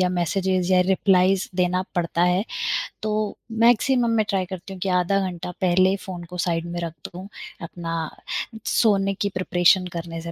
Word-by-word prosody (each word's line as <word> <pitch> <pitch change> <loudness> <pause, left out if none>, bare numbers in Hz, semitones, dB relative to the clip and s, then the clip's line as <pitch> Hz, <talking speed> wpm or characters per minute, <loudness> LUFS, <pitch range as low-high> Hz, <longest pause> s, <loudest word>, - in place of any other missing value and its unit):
या 180 - +3
मेसेजस 185 +1 0
या 185 -1 +5
रिप्लाइज़ 190 0 +3
देना 180 0 +1
पड़ता 170 0 0
है, 180 +3 +2 0.6
तो 215 -1 -1
मैक्सिमम 235 +2 +3
मैं 215 - +2
ट्राय 190 -2 0
करती 190 +1 -8
हूँ 185 - -9
कि 195 - -1
आधा 180 +2 +2
घंटा 180 0 -6
पहले 185 +1 +4
फ़ोन 180 -2 -6
को - - -5
साइड 165 0 0
में 175 - -3
रख 165 -2 -4
दूँ, 185 +2 -9 0.3
अपना 165 -1 -4 0.6
सोने 195 -3 +2
की 200 +1 -2
प्रिपरेशन 185 0 +3
करने 165 0 -5
से 170 0 -6
185 Hz, 170 wpm, -23 LUFS, 175-195 Hz, 0.6 s, या